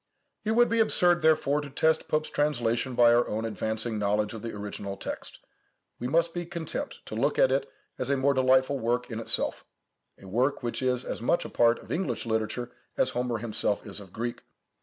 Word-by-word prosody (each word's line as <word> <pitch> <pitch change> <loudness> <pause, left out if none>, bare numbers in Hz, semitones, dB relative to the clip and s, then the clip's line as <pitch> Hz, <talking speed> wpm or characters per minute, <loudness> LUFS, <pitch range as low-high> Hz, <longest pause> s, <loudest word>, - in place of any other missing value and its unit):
It 220 - 0
would 240 +1 +5
be 230 - +1
absurd, 175 -5 +4
therefore, 150 -2 +3
to 145 - -8
test 160 +3 +1
Pope's 155 0 -1
translation 125 -4 0
by 120 -1 +6
our 120 +1 +3
own 110 +2 -2
advancing 110 0 -2
knowledge 105 +1 0
of 110 - -7
the 115 - -5
original 100 -1 -5
text. - - -6 0.6
We 125 - -2
must 165 +4 +2
be 175 - -3
content 170 - -4
to - - -8
look - - 0
at - - +5
it 440 - 0 0.3
as 130 - -2
a 140 - +2
most 140 +1 +3
delightful 130 +1 +3
work 120 +2 -1
in 110 - -3
itself,—a 110 -3 -2
work 125 +8 0
which 120 +1 -2
is 125 0 0
as - - -4
much 145 +8 +1
a - - -5
part 120 0 +3
of - - -12
English 180 -6 -1
literature 110 +2 -2 0.3
as - - +2
Homer 125 -1 -1
himself 110 -2 -1
is 105 -1 -6
of 95 -3 -12
Greek. 120 +3 -4
125 Hz, 200 wpm, -28 LUFS, 115-150 Hz, 0.6 s, by